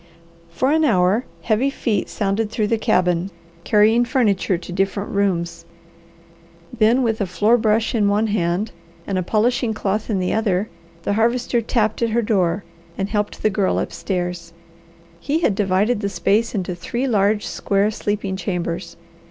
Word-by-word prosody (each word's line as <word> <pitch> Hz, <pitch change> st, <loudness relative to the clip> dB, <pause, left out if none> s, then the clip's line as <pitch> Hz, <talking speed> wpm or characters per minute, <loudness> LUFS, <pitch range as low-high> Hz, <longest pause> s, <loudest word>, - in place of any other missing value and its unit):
For 255 Hz, +12 st, 0 dB
an 315 Hz, +1 st, +3 dB
hour 205 Hz, -2 st, +3 dB, 0.2 s
heavy 235 Hz, +5 st, +2 dB
feet 225 Hz, -7 st, -1 dB
sounded 210 Hz, +2 st, -1 dB
through 215 Hz, -1 st, -1 dB
the 230 Hz, -, +1 dB
cabin 180 Hz, -2 st, +1 dB, 0.3 s
carrying 220 Hz, +4 st, +4 dB
furniture 210 Hz, -, +1 dB
to 175 Hz, -, -9 dB
different 195 Hz, +2 st, -1 dB
rooms. 185 Hz, -4 st, -1 dB, 1.1 s
Then 235 Hz, +3 st, +3 dB
with 225 Hz, -2 st, 0 dB
a 200 Hz, -, 0 dB
floor 210 Hz, +6 st, +3 dB
brush 220 Hz, -1 st, +1 dB
in 215 Hz, -4 st, +2 dB
one 205 Hz, +2 st, +2 dB
hand, 200 Hz, 0 st, -1 dB, 0.3 s
and 195 Hz, -2 st, -1 dB
a -, -, 0 dB
polishing 225 Hz, +4 st, +1 dB
cloth 210 Hz, +2 st, -2 dB
in 210 Hz, -, +1 dB
the 180 Hz, -1 st, -1 dB
other, 210 Hz, -2 st, 0 dB, 0.3 s
the 205 Hz, -, 0 dB
Harvester 235 Hz, +2 st, +1 dB
tapped 220 Hz, -1 st, 0 dB
at 230 Hz, -, +2 dB
her 235 Hz, +2 st, +1 dB
door 190 Hz, -3 st, +1 dB, 0.3 s
and 195 Hz, 0 st, -2 dB
helped 210 Hz, -1 st, -2 dB
the 215 Hz, -, +3 dB
Girl 190 Hz, -1 st, +1 dB
upstairs. 180 Hz, -3 st, -3 dB, 0.7 s
He 295 Hz, -, -1 dB
had 235 Hz, -, +2 dB
divided 205 Hz, +3 st, +1 dB
the 200 Hz, -1 st, -2 dB
space 215 Hz, +4 st, +1 dB
into 185 Hz, -2 st, -2 dB
three 235 Hz, +9 st, -3 dB
large, 210 Hz, -3 st, +2 dB
square 200 Hz, +1 st, 0 dB
sleeping 205 Hz, -2 st, -2 dB
chambers. 175 Hz, -2 st, -4 dB
210 Hz, 160 wpm, -21 LUFS, 190-225 Hz, 1.1 s, carrying